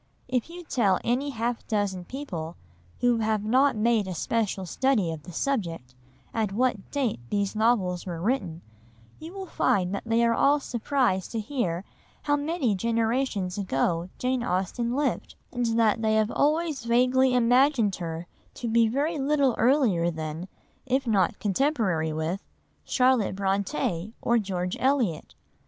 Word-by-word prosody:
If 250 Hz, +3 st, -1 dB
you 350 Hz, +1 st, -9 dB
tell 210 Hz, -, +2 dB
any 260 Hz, +4 st, 0 dB
half 235 Hz, -2 st, -3 dB
dozen 200 Hz, -5 st, -1 dB
people, 175 Hz, -, -6 dB, 0.5 s
who 245 Hz, -1 st, +3 dB
have 215 Hz, -2 st, 0 dB
not 260 Hz, +6 st, +3 dB
made 220 Hz, -2 st, +2 dB
a 185 Hz, -, -4 dB
special 205 Hz, 0 st, -1 dB
study 215 Hz, -3 st, +1 dB
of 160 Hz, -2 st, -6 dB
the 175 Hz, -, -11 dB
subject, 170 Hz, -, -2 dB, 0.4 s
at 220 Hz, -3 st, 0 dB
what 235 Hz, -1 st, 0 dB
date 265 Hz, -, -1 dB
these 205 Hz, 0 st, -1 dB
novels 205 Hz, -6 st, +1 dB
were 170 Hz, -2 st, -4 dB
written, 185 Hz, -5 st, -2 dB, 0.6 s
you 320 Hz, +2 st, -8 dB
will 385 Hz, 0 st, -6 dB
find 190 Hz, -, +1 dB
that 200 Hz, -, -2 dB
they 230 Hz, +1 st, +2 dB
are 230 Hz, -, +3 dB
all 285 Hz, +5 st, +3 dB
surprised 240 Hz, -7 st, 0 dB
to 225 Hz, -, -1 dB
hear 210 Hz, -7 st, -2 dB, 0.4 s
how 290 Hz, -, +2 dB
many 290 Hz, -5 st, 0 dB
generations 225 Hz, -2 st, 0 dB
ago 170 Hz, 0 st, 0 dB
Jane 255 Hz, 0 st, 0 dB
Austen 235 Hz, +4 st, -1 dB
lived, 290 Hz, 0 st, -1 dB, 0.2 s
and 245 Hz, -1 st, 0 dB
that 225 Hz, 0 st, +3 dB
they 220 Hz, -1 st, +2 dB
have 220 Hz, 0 st, +2 dB
always 305 Hz, -2 st, +1 dB
vaguely 250 Hz, +2 st, +3 dB
imagined 245 Hz, -3 st, +3 dB
her 165 Hz, -1 st, -5 dB, 0.3 s
to 240 Hz, -, -5 dB
be 230 Hz, 0 st, +4 dB
very 290 Hz, +7 st, -1 dB
little 275 Hz, -2 st, +2 dB
earlier 225 Hz, -, +3 dB
than, 160 Hz, +1 st, -5 dB, 0.4 s
if 265 Hz, +1 st, +1 dB
not 195 Hz, -7 st, +2 dB
contemporary 200 Hz, -, 0 dB
with, 160 Hz, +5 st, -2 dB, 0.4 s
Charlotte 250 Hz, -7 st, +2 dB
Brontë 200 Hz, -, -1 dB
or 235 Hz, 0 st, +2 dB
George 180 Hz, -3 st, -2 dB
Eliot. 255 Hz, -, 0 dB
225 Hz, 150 wpm, -26 LUFS, 185-260 Hz, 0.6 s, be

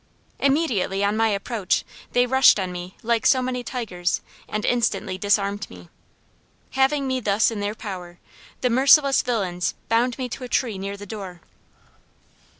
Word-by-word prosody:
Immediately 260 Hz, -, +1 dB
on 200 Hz, +1 st, +1 dB
my 225 Hz, +1 st, +3 dB
approach, 205 Hz, -1 st, -1 dB, 0.3 s
they 245 Hz, 0 st, +4 dB
rushed 265 Hz, -3 st, +5 dB
on 185 Hz, -1 st, -2 dB
me 180 Hz, +1 st, -8 dB
like 230 Hz, 0 st, +1 dB
so 260 Hz, -, +5 dB
many 250 Hz, -1 st, -2 dB
tigers, 190 Hz, -9 st, -2 dB, 0.3 s
and 215 Hz, 0 st, -2 dB
instantly 215 Hz, -5 st, 0 dB
disarmed 200 Hz, +1 st, 0 dB
me. 90 Hz, -1 st, -13 dB, 0.8 s
Having 270 Hz, +2 st, +2 dB
me 260 Hz, -1 st, 0 dB
thus 210 Hz, -1 st, +2 dB
in 220 Hz, -, -4 dB
their 205 Hz, +1 st, -2 dB
power, 180 Hz, -6 st, -7 dB, 0.4 s
the 250 Hz, -, +1 dB
merciless 275 Hz, +2 st, +5 dB
villians 190 Hz, -8 st, -1 dB
bound 235 Hz, +2 st, +2 dB
me 260 Hz, -2 st, -3 dB
to 250 Hz, -, -7 dB
a -, -, -5 dB
tree 225 Hz, -7 st, 0 dB
near 200 Hz, +1 st, -5 dB
the 205 Hz, -, -9 dB
door. 190 Hz, -4 st, -8 dB
215 Hz, 155 wpm, -23 LUFS, 195-250 Hz, 0.8 s, rushed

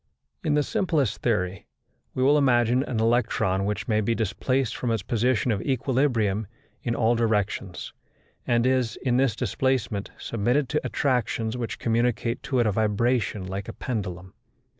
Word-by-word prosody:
In 155 Hz, -3 st, +1 dB
the 150 Hz, -, +3 dB
simplest 160 Hz, -, 0 dB
theory, 95 Hz, -6 st, -1 dB, 0.5 s
we 130 Hz, -, +1 dB
will 140 Hz, +3 st, +5 dB
imagine 120 Hz, -2 st, +3 dB
an 125 Hz, -4 st, -2 dB
electron 110 Hz, -4 st, +1 dB
which 105 Hz, +1 st, -2 dB
may 110 Hz, -2 st, +2 dB
be 115 Hz, +2 st, 0 dB
displaced 115 Hz, +3 st, 0 dB
from 125 Hz, -, -2 dB
its 115 Hz, -4 st, 0 dB
position 120 Hz, +2 st, +1 dB
of 100 Hz, -2 st, -1 dB
equilibrium 125 Hz, -6 st, +1 dB, 0.3 s
in 120 Hz, -1 st, -1 dB
all 115 Hz, +1 st, +3 dB
directions, 105 Hz, -5 st, -1 dB, 0.5 s
and 120 Hz, -1 st, +2 dB
is, 130 Hz, -3 st, +1 dB
in 125 Hz, -2 st, +2 dB
this 130 Hz, -4 st, +2 dB
displacement, 120 Hz, -6 st, -1 dB
submitted 120 Hz, +5 st, 0 dB
to 150 Hz, -, 0 dB
attractions 120 Hz, -4 st, 0 dB
which 120 Hz, -2 st, -4 dB
communicate 120 Hz, 0 st, 0 dB
to 130 Hz, -, -2 dB
it 120 Hz, -, +3 dB
a 105 Hz, -, +2 dB
vibration 110 Hz, -1 st, 0 dB
like 95 Hz, +1 st, -5 dB
a -, -, -6 dB
pendulum. 95 Hz, -6 st, -5 dB
115 Hz, 155 wpm, -25 LUFS, 105-130 Hz, 0.5 s, will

